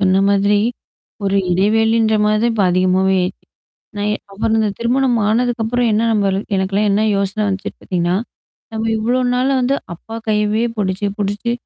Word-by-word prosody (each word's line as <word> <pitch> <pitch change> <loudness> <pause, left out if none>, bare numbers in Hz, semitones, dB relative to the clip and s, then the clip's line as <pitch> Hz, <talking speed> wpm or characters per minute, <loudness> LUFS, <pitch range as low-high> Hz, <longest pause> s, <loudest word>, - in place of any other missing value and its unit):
சொன்ன 190 -1 +3
மாதிரி. 200 +1 +3 0.7
ஒரு 195 0 +1
இடைவெளின்ற 220 +4 +2
மாரி 210 0 +2
தான் 235 0 +2
இப்ப 210 -3 +1
அதிகமாவே 185 +1 +2
ஆயிச்சு. 180 +1 -4 0.5
நான் 205 +1 -1 0.2
அப்புறம் 220 +3 0
இந்த 215 - +1
திருமணம் 245 +1 +1
ஆனதுக்கப்புறம் 240 +1 0
என்ன 215 +1 +2
நம்ப 205 -2 +1
ல் 195 - -1
எனக்கெல்லாம் 195 +2 0
என்ன 200 +2 +2
யோசனை 195 +2 -1
வந்துச்சுன்னு 195 -1 -4
பார்த்தீங்கன்னா, 175 -1 -1 0.6
நம்ம 220 0 -2
இவ்ளோ 240 +4 0
நாள் 255 +2 +1
வந்து 255 +2 +1 0.2
அப்பா 220 +6 -11
கையவே 210 +1 +1
புடிச்சு, 190 0 -1
புடிச்சு 205 +3 -2
210 Hz, 155 wpm, -18 LUFS, 195-225 Hz, 0.7 s, சொன்ன